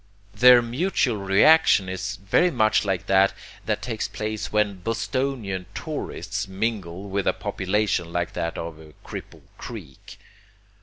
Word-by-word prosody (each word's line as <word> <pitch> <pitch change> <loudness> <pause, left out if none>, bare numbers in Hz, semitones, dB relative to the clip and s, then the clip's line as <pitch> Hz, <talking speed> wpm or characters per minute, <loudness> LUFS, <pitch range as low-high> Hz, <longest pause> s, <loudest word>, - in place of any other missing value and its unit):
Their 125 +2 +7
mutual 125 - 0
reaction 100 +3 +5
is 95 +2 -4
very 100 - +2
much 110 -9 +2
like 95 -3 -1
that 95 0 +4 0.3
that - - -1
takes 115 -3 -3
place 105 -1 -4
when 105 -3 +1
Bostonian 115 -3 -2
tourists - - -4
mingle 95 -2 -3
with 100 0 -2
a - - +4
population 95 -3 -1
like 85 0 -2
that 85 0 -3
of 85 -1 -6 0.3
Cripple - - -9 0.2
Creek. 95 - -10
100 Hz, 125 wpm, -24 LUFS, 95-115 Hz, 0.3 s, Their